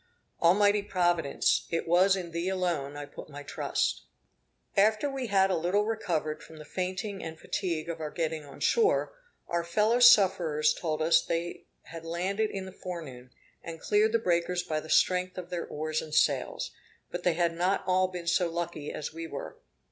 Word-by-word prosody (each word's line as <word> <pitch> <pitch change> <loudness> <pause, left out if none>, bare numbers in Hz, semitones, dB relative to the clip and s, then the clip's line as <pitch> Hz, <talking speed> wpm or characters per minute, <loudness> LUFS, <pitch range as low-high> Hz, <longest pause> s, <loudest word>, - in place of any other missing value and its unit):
Almighty 205 +4 +4
Providence! 175 -6 +1
it 165 0 -2
was 185 +3 +5
in 175 -3 -5
Thee 170 +2 -2
alone 170 -7 -2
I 145 - -5
put 145 - -11
my 145 0 -9
trust. 145 - -1 0.7
After 215 +6 +3
we 270 -3 -3
had 195 -2 +3
a - - +2
little 180 +5 +1
recovered 170 -9 -2
from 160 - -13
the 150 - -10
fainting 190 +4 -4
and 160 -1 -7
fatigue 170 -5 -3
of 165 -1 -4
our 155 - -3
getting 160 -1 -2
on 140 - -13
shore, 450 +1 +2 0.3
our 170 0 -1
fellow 210 +8 +2
sufferers 175 -10 +5
told 155 -2 -2
us 165 +1 +4
they 170 +1 -3 0.2
had 165 0 -9
landed 190 +6 -1
in 195 -1 -5
the 190 - -8
forenoon, 155 -10 -8 0.3
and 165 -1 -7
cleared 210 +4 +2
the - - +5
breakers 175 -3 0
by 155 -1 -2
the 155 - -11
strength 185 +2 +2
of 180 -1 -7
their 175 -1 -3
oars 155 +1 -2
and 155 -1 -6
sails; - - +1 0.4
but 175 - -4
they 175 -1 +2
had 170 0 +1
not 180 +4 0
all 185 0 +3
been 180 -2 -7
so 175 +1 +2
lucky 165 -3 -4
as 150 - -5
we 165 0 -6
were. 140 - -7
175 Hz, 185 wpm, -29 LUFS, 160-190 Hz, 0.7 s, was